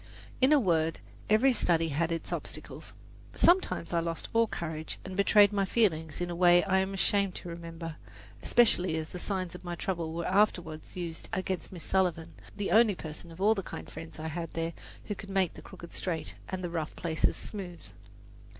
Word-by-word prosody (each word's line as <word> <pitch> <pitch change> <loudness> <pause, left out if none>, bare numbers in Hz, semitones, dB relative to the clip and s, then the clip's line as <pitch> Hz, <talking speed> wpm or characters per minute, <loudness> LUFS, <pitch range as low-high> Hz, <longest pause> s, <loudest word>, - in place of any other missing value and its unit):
In 260 +3 +5
a 300 - +7
word, 165 -7 +2 0.3
every 240 +5 +5
study 165 -7 +2
had 160 +3 0
its 165 - -3
obstacles. - - -7 0.4
Sometimes 345 - +3
I 170 - +3
lost 165 -1 -3
all 230 0 +4
courage 160 -5 -4
and 190 0 -6
betrayed 205 +1 +6
my 200 -1 +2
feelings 160 -8 +1
in 175 0 -2
a - - -3
way 175 0 +6
I 190 -1 +2
am 190 +1 -1
ashamed 200 -1 +2
to 175 - -6
remember, 165 -1 -7 0.4
especially 185 -8 +3
as 160 0 -4
the 180 - -7
signs 185 -2 -2
of 180 - -10
my 175 -1 -4
trouble 165 -2 -3
were 170 +1 -3
afterward 180 -6 +2
used 170 -3 -5
against 185 -2 -2
Miss 175 -3 -9
Sullivan, 170 -3 0 0.2
the 200 -4 -2
only 220 0 +6
person 160 +1 -8
of 165 - -12
all 210 +3 +5
the 200 - -2
kind - - -7
friends 165 - -8
I 160 0 -4
had 165 +1 -4
there, 165 0 -2 0.3
who 210 - -2
could 200 -1 -9
make 190 -3 +1
the - - -11
crooked 170 - -11
straight 165 -4 -3 0.2
and 185 -1 -4
the 175 - -3
rough 160 -3 -3
places 160 -2 +1
smooth. 185 -5 -7
175 Hz, 195 wpm, -30 LUFS, 165-195 Hz, 0.4 s, a